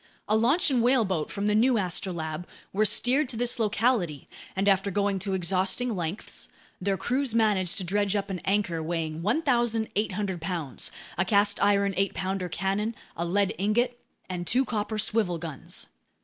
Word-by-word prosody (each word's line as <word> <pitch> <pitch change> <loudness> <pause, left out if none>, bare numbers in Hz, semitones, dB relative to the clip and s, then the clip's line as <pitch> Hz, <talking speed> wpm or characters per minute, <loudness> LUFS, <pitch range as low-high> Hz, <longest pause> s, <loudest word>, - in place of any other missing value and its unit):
A 215 - +2
launch 275 - +3
and 250 -3 +3
whaleboat 220 - +2
from 200 0 -3
the 210 - +2
new 235 +3 +4
Astrolabe 175 -4 -2 0.3
were 215 +2 +3
steered 250 +7 +3
to 235 - -5
this 240 0 +2
locality, 210 - +1 0.3
and 195 +1 0
after 195 0 +3
going 200 0 0
to 195 0 -1
exhausting 190 +6 0
lengths, 175 +2 -4 0.3
their 195 +1 0
crews 255 +1 0
managed 210 -5 +2
to 195 - -1
dredge 200 +2 0
up 200 -1 -1
an 185 - -3
anchor 190 -4 0
weighing 160 -1 -3
1,800 220 - 0
pounds, 165 -6 -3 0.3
a - - +4
cast 205 +1 +3
iron 200 -1 +3
eight 195 0 +1
pounder 190 -1 -2
cannon, 200 +5 -1 0.2
a 170 - -2
lead 200 +3 +1
ingot, 240 +5 +1 0.3
and 175 -2 -4
two 260 +3 +3
copper 215 -2 -2
swivel 215 -4 +2
guns. 160 -4 -5
200 Hz, 165 wpm, -27 LUFS, 185-225 Hz, 0.3 s, new